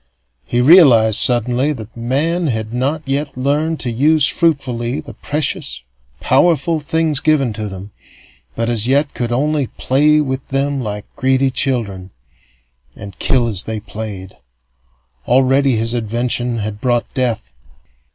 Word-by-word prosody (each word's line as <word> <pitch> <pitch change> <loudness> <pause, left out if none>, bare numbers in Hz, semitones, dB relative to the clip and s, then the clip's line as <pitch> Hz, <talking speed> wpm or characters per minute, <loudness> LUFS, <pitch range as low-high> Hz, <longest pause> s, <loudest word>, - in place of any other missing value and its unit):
He 120 - 0
realized, 125 - +6
suddenly, 125 +4 +2
that 110 -5 -10
men 150 +9 -1
had 110 -3 -3
not 140 +5 -2
yet 140 0 -2
learned 150 +5 0
to 120 0 -2
use 145 +5 +3
fruitfully 135 -6 0
the 150 -2 -10
precious, 145 - -3 0.4
powerful 160 +3 +2
things 155 -1 0
given 145 -7 +1
to 110 0 -4
them, 95 +1 -8 0.6
but 115 0 -1
as 115 -1 -1
yet 140 +2 +2
could 120 -1 -3
only 145 +2 0
play 150 +6 +2
with 130 -3 -3
them 140 0 -1
like 105 -3 -5
greedy 130 0 +1
children 110 -9 -2 0.9
and 100 -2 -11
kill 125 -3 +2
as 100 -5 0
they 110 -1 -3
played. 105 -3 -7 0.9
Already 135 +1 +3
his 115 +1 -1
invention 120 +1 -2
had 105 -1 -5
brought 120 -2 +1
death. 115 - -2
130 Hz, 135 wpm, -17 LUFS, 115-145 Hz, 0.9 s, realized